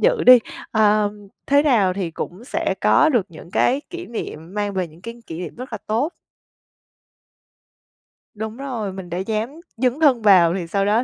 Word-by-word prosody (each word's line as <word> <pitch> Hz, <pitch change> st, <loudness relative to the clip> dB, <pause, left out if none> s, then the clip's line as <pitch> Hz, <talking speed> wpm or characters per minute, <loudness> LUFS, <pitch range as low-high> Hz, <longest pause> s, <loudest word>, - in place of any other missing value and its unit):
dự -, -, +2 dB
đi. 250 Hz, -1 st, +10 dB, 0.3 s
Ơ, 210 Hz, -1 st, +3 dB, 0.4 s
thế 285 Hz, +1 st, +4 dB
nào 220 Hz, -11 st, +3 dB
thì 180 Hz, -3 st, -3 dB
cũng 180 Hz, +7 st, -7 dB
sẽ -, -, -1 dB
có 310 Hz, -, +5 dB
được 240 Hz, -10 st, +1 dB
những 170 Hz, +1 st, -13 dB
cái 265 Hz, +3 st, +2 dB
kỷ 355 Hz, 0 st, -7 dB
niệm, 180 Hz, -6 st, -7 dB
mang 205 Hz, -1 st, -2 dB
về 185 Hz, -3 st, -1 dB
những 160 Hz, +2 st, -18 dB
cái 230 Hz, 0 st, -7 dB
kỷ 160 Hz, -, -7 dB
niệm 175 Hz, -4 st, -6 dB
rất 250 Hz, 0 st, -8 dB
là 220 Hz, -, -3 dB
tốt. 245 Hz, +11 st, 0 dB, 2.2 s
Đúng 220 Hz, +2 st, -5 dB
rồi, 235 Hz, -8 st, -4 dB
mình 190 Hz, -2 st, -8 dB
đã 175 Hz, -, -4 dB
dám 215 Hz, +4 st, -2 dB, 0.3 s
dấn 255 Hz, +4 st, 0 dB
thân 270 Hz, -7 st, +4 dB
vào 180 Hz, -5 st, +6 dB
thì 180 Hz, -3 st, -4 dB
sau 195 Hz, +3 st, 0 dB
đó 220 Hz, +4 st, +2 dB
215 Hz, 185 wpm, -21 LUFS, 185-250 Hz, 2.2 s, đi